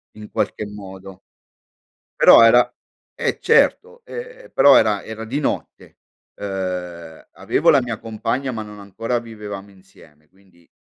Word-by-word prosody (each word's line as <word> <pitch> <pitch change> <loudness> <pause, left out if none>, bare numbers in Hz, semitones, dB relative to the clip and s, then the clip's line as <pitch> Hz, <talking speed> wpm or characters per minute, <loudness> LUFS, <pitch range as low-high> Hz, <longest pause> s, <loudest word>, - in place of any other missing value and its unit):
in 105 0 -11
qualche 105 - -2
modo. 95 -2 -11 1.0
Però - - +8
era 120 +2 +6 0.5
eh - - -2
certo, 475 +2 +2
ehm, - - -10
però 140 -1 +6
era 105 -2 +2
era 110 0 -8
di 135 +6 -3
notte, 145 - -5 0.4
uhm, 90 -4 -6
avevo - - +1
la 140 - +5
mia 120 -3 -5
compagna 120 +4 -3
ma 110 -2 -5
non 105 -1 -12
ancora 115 +5 -3
vivevamo 105 -4 -9
insieme 75 -5 -21
quindi 95 -2 -27
105 Hz, 135 wpm, -20 LUFS, 95-120 Hz, 1.0 s, Però